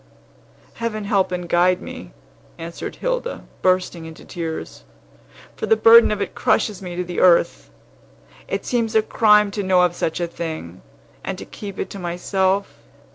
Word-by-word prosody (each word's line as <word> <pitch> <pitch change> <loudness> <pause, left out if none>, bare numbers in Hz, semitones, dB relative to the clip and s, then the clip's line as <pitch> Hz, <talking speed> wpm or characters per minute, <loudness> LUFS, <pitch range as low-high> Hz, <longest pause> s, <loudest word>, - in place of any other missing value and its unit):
"Heaven 215 -2 -2
help 195 -2 +1
and 180 -1 -3
guide 180 +2 +3
me," - - -9 0.5
answered 170 +1 -7
Hilda, - - -3 0.2
bursting 185 -2 +1
into 160 0 -11
tears; 165 -2 -6 0.7
"for - - -4
the 445 - +5
burden 230 - +7
of 210 - -1
it - - -7
crushes 210 -4 +1
me 180 -2 -6
to 180 - -2
the 175 0 -4
earth! 170 -2 +3 0.8
It - - -3
seems 230 -2 -1
a 220 - +5
crime 210 -2 +4
to 205 - -3
know 185 -2 +3
of 175 -1 +2
such 165 0 -2
a 175 - 0
thing, 160 - -6 0.4
and - - -4
to - - -8
keep 200 -2 -9
it - - -4
to 200 - -7
myself. 190 +2 -1
185 Hz, 165 wpm, -21 LUFS, 175-210 Hz, 0.8 s, burden